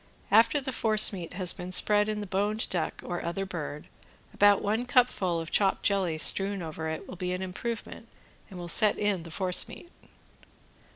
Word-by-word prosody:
After 230 +7 +5
the 265 -1 -5
force 215 -3 +3
meat 175 -3 -7
has 180 -1 +3
been 180 +1 -8
spread 210 +3 +4
in 210 -1 -3
the - - -5
boned 205 +3 -1
duck, 175 -3 -2
or 175 -1 -4
other 195 +3 -3
bird, 150 -5 -6 0.5
about 205 0 +4
one 220 +4 -1
cupful 240 -9 +2
of 165 0 -7
chopped 195 -2 +2
jelly 190 -5 0
strewn 195 +3 +1
over 160 0 -5
it 160 - -6
will 185 - -9
be 180 0 -3
an 185 +1 -4
improvement 225 +4 -6 0.4
and 190 - -10
will 175 -1 -7
set 205 +5 +2
in 205 -4 0
the 165 - -10
force 180 +2 +1
meat. 345 - -12
195 Hz, 185 wpm, -28 LUFS, 175-210 Hz, 0.5 s, After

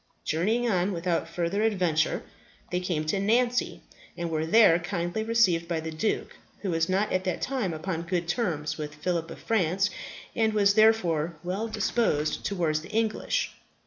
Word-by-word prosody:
Journeying 220 +10 +1
on 190 -2 +1
without 170 0 -1
further 175 +4 -1
adventure, 180 -8 +1 0.5
they 180 - +1
came 175 -4 -2
to 175 +6 0
Nancy, 240 +5 +1 0.4
and 170 -1 -3
were 160 0 -1
there 175 -3 +6
kindly 175 +3 -2
received 200 -8 +2
by 170 -2 -1
the 160 0 -5
duke, 160 +7 -2 0.3
who 190 - -1
was 165 +1 +1
not 195 +3 +1
at 185 0 +1
that 185 - -1
time 250 -9 -1
upon 165 +1 -3
good 170 0 -2
terms 160 -7 -1
with 150 -1 -5
Phillip 165 +2 -2
of - - -8
France, 195 -2 +1 0.4
and 220 -1 +2
was 200 -1 +4
therefore 180 -7 +3
well 190 +6 -2
disposed 185 -9 0
towards 165 -6 0
the 170 - -11
English. 225 - 0
180 Hz, 165 wpm, -27 LUFS, 165-215 Hz, 0.5 s, there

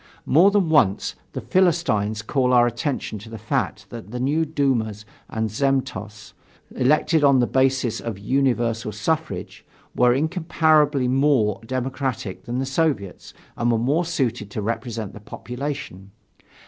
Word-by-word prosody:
More 170 +8 +5
than 200 -3 +2
once, 130 -11 +2 0.2
the - - -4
Philistines 155 - +1
called 125 +1 +1
our 120 -1 +6
attention 120 -2 -3
to 110 +3 -12
the 115 - -7
fact 110 +2 -3
that 115 -3 -8
the 125 +2 -5
new 150 +6 +1
dumas 120 -9 -1 0.2
and 110 0 -1
zemstvos 125 -4 -2 0.4
elected 150 +4 +2
on 140 -2 +5
the 120 - +3
basis 130 -2 +1
of 115 -4 -5
universal 120 -1 0
suffrage, 105 - -3 0.3
were 125 0 +4
incomparably 155 -2 +2
more 130 -6 +2
democratic 130 -5 -3
than 120 +1 -3
the 135 - -1
Soviets 135 - -2 0.2
and 120 0 +1
were 115 - +2
more 140 +9 +1
suited 130 - -2
to 105 - -4
represent 115 -1 -4
the - - -10
population. 125 -3 -6
125 Hz, 140 wpm, -23 LUFS, 110-145 Hz, 0.4 s, our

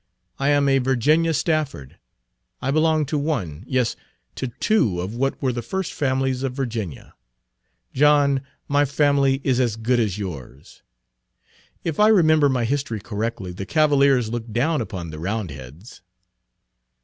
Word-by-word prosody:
I 135 +1 +1
am 145 -1 +3
a 135 0 +4
Virginia 145 +6 +2
Stafford. 155 - -2 0.6
I 135 - -1
belong 155 0 +2
to 150 +2 -1
one, 105 - -3
yes, 130 -3 0 0.4
to 130 - -4
two 120 - +1
of 95 +4 -4
what 135 +3 -1
were 130 -2 0
the 120 - -3
first 190 +6 -4
families 130 -2 0
of 135 -2 -2
Virginia. 115 - -5 0.8
John, 140 -1 +4 0.3
my 145 0 +3
family 140 -1 +2
is 130 -2 +1
as 120 -4 +1
good 120 +2 0
as 105 -4 0
yours. 75 -9 -8 1.0
If 160 -3 -3
I 210 - +6
remember 155 -8 +5
my 125 -3 0
history 130 -3 -2
correctly, 105 -2 -4
the 95 +2 -7
Cavaliers 140 -6 +3
looked 120 -1 -5
down 140 +6 +1
upon 90 -7 -6
the 75 - -8
Roundheads." 85 - -6
130 Hz, 145 wpm, -22 LUFS, 110-145 Hz, 1.0 s, I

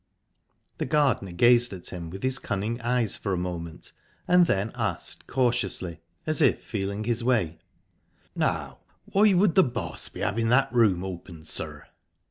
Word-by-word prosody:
The - - -1
gardener 130 -10 +1
gazed 120 +5 +4
at 90 -2 -6
him 85 -2 -6
with 95 +3 -8
his 130 0 0
cunning 110 +5 -3
eyes 120 -3 +1
for 100 - -3
a - - 0
moment, 85 -2 -5 0.4
and 180 -1 +5
then 100 +3 0
asked - - -3
cautiously, 100 -9 -1 0.3
as 155 +1 +1
if 140 - +3
feeling 100 -1 -3
his 120 +1 -1
way: 110 -10 +1 0.8
"Now, - - -1 0.3
why 200 0 +4
would 185 -1 +4
the 190 - +6
boss 115 - -4
be - - -9
having 115 +3 0
that 125 0 +3
room 105 -7 +3
opened, 85 -3 -8
sir?" - - -2
115 Hz, 155 wpm, -26 LUFS, 90-125 Hz, 0.8 s, the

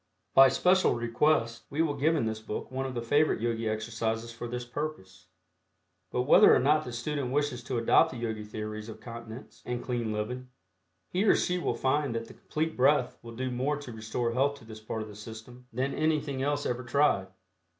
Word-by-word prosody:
By 135 0 +8
special 185 +7 +3
request 115 -1 +1
we 155 +3 +1
will 155 -3 0
give 150 +4 +2
in 135 - +1
this 110 -1 -2
book 110 +2 -6
one 135 +1 -2
of 130 - -6
the 120 - -2
favorite 145 +6 +2
Yogi 115 -1 -1
exercises 115 +1 -2
for 115 +1 -6
this 120 +1 -4
purpose. 105 - -6 0.8
But 125 - 0
whether 135 - +7
or - - +4
not 150 +3 +3
the 125 - -6
student 125 +2 -3
wishes 145 -3 0
to 130 - -2
adopt 115 - +4
the 130 - -7
Yogi 110 -2 -3
theories 110 +1 -6
of 110 0 -9
continence 115 +1 -10
and 120 0 -4
clean 120 -3 -2
living, 125 +4 -4 0.6
he 185 +3 +1
or - - +6
she 180 0 0
will 145 - -1
find 135 +1 0
that 115 0 -2
the - - -12
Complete 160 +1 -3
Breath 130 -1 +3
will 115 -1 -10
do 130 +1 -2
more 135 +4 0
to 145 -4 -8
restore 110 +2 -2
health 140 +3 +2
to 120 - -16
this 110 -1 -10
part 110 0 -4
of - - -9
the 105 - -11
system 110 +4 -11
than 130 +4 -1
anything 155 -3 0
else 145 +1 0
ever 125 +1 -2
tried. 120 -7 +2
120 Hz, 205 wpm, -29 LUFS, 115-145 Hz, 0.8 s, By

